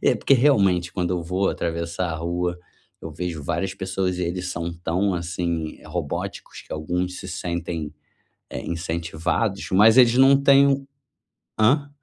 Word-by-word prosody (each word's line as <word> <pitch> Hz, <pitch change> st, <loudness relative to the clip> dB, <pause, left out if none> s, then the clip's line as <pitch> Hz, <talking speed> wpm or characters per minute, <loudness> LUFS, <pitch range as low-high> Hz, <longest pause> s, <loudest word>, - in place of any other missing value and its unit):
é -, -, +4 dB
porque -, -, +1 dB
realmente 100 Hz, -10 st, +3 dB
quando 90 Hz, -2 st, -1 dB
eu 90 Hz, -1 st, -2 dB
vou 90 Hz, +3 st, 0 dB
atravessar 85 Hz, +1 st, -3 dB
a 80 Hz, -, -3 dB
rua 85 Hz, +2 st, -2 dB, 0.4 s
eu 80 Hz, -, -6 dB
vejo 85 Hz, -1 st, -4 dB
várias 85 Hz, +6 st, -2 dB
pessoas 95 Hz, -1 st, -2 dB
e -, -, -2 dB
eles 90 Hz, +1 st, -3 dB
são 85 Hz, -1 st, -4 dB
tão 90 Hz, +4 st, -1 dB
assim 85 Hz, -2 st, -3 dB
robóticos 80 Hz, -2 st, -5 dB
que -, -, -11 dB
alguns 90 Hz, +4 st, -3 dB
se -, -, -8 dB
sentem, 85 Hz, -3 st, -4 dB, 0.6 s
eh, -, -, -5 dB
incentivados, 85 Hz, +4 st, -2 dB
mas 110 Hz, +4 st, +6 dB
eles 120 Hz, -2 st, +6 dB
não 135 Hz, +1 st, +7 dB
têm 140 Hz, 0 st, +6 dB
um 135 Hz, 0 st, 0 dB, 0.7 s
hã? 140 Hz, +7 st, +3 dB
90 Hz, 155 wpm, -23 LUFS, 85-100 Hz, 0.7 s, não